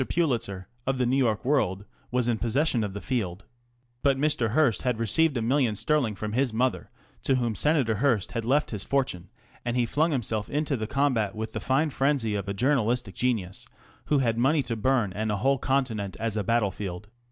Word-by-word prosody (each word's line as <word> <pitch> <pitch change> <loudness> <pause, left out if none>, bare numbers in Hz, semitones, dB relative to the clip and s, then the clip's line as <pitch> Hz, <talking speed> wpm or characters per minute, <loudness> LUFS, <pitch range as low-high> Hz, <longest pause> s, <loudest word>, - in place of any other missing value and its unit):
Pulitzer, 115 - -1 0.2
of 135 0 +1
the 125 - +1
New 125 +2 +2
York 115 -5 +1
World, 105 -9 +1 0.2
was 125 -1 0
in 115 -2 +1
possession 120 0 +1
of 100 -2 -3
the 100 - -5
field. 100 -8 -3 0.6
But 140 -1 +3
Mr. 135 -6 +1
Hearst 140 -6 +3
had 125 -3 0
received 140 +6 +2
a 115 - -1
million 125 -2 +2
sterling 130 -3 +1
from 105 +1 -4
his 130 +1 +1
mother, 125 +3 -1 0.3
to 135 - +2
whom 120 -3 0
Senator 140 -2 +2
Hearst 120 -5 +1
had 115 -1 -3
left 140 +6 +1
his 105 -3 -4
fortune, 130 -11 -1 0.3
and 120 0 -1
he 120 - +3
flung 155 +7 +1
himself 110 -6 -2
into 150 0 0
the 110 -3 -3
combat 125 -7 +1
with 110 0 -4
the - - -4
fine 150 +4 +1
frenzy 135 -6 +1
of 100 -1 -3
a - - -1
journalistic 125 -3 +1
genius 120 0 -2 0.4
who 150 - +2
had 115 -4 +1
money 140 +4 +3
to 120 -2 -3
burn 115 -3 +1
and 110 +2 -2
a 105 - 0
whole 135 +5 +2
continent 120 -8 -1
as 115 -1 -1
a 105 - 0
battlefield. 100 -3 -1
120 Hz, 200 wpm, -27 LUFS, 105-135 Hz, 0.6 s, But